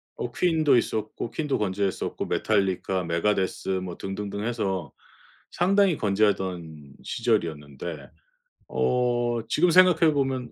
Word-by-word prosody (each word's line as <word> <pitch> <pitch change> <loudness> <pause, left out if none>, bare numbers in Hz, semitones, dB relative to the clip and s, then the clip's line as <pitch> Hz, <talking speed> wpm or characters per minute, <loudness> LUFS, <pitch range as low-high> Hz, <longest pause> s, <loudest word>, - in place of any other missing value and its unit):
어 120 - -4
퀸도 160 -3 +3
있었고 110 -1 -2
퀸도 150 -3 -1
건재했었고 100 -1 -2
메탈리카 95 -3 0
메가데스 95 +4 -1
뭐 95 -2 -2
등등등 100 +1 -5
해서 95 - -2 0.6
상당히 190 -1 +3
건재하던 95 - -1
시절이었는데 75 0 -2 0.6
어 120 -2 0
지금 175 +3 +3
생각해 170 -3 +6
보면 130 -3 -1
105 Hz, 275 characters per minute, -26 LUFS, 95-130 Hz, 0.6 s, 생각해